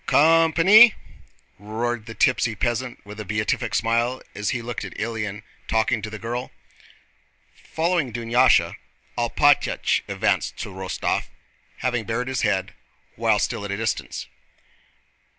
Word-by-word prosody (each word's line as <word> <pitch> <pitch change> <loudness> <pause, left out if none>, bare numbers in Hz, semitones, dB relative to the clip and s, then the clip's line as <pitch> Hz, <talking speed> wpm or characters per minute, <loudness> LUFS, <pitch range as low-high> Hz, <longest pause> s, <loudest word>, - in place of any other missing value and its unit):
"Co - - +3
o 165 +3 +6
om 160 - -1
pa 165 - +2
ny!" 215 +4 +8 0.6
roared 115 +3 -3
the 115 - -8
tipsy 120 -3 +2
peasant 120 +3 -2
with 105 +1 -10
a - - -4
beatific 105 +4 -2
smile 115 +3 +1
as 105 0 -3
he 120 - -1
looked 120 -2 -5
at 100 - -8
Ilyín 105 -2 -4 0.2
talking 110 +1 +1
to 110 - -5
the 110 - -7
girl. 120 +3 -4 1.0
Following 165 -5 -1
Dunyásha, 120 +2 +3 0.4
Alpátych 140 +5 +2
advanced - - -1
to - - -5
Rostóv, 95 0 -2 0.6
having 120 -3 0
bared 120 +4 -2
his 130 - -1
head 95 -4 0 0.4
while 115 -1 +2
still 115 +1 -2
at 100 - -5
a 100 - -2
distance. 110 +1 -3
115 Hz, 145 wpm, -23 LUFS, 105-125 Hz, 1.0 s, ny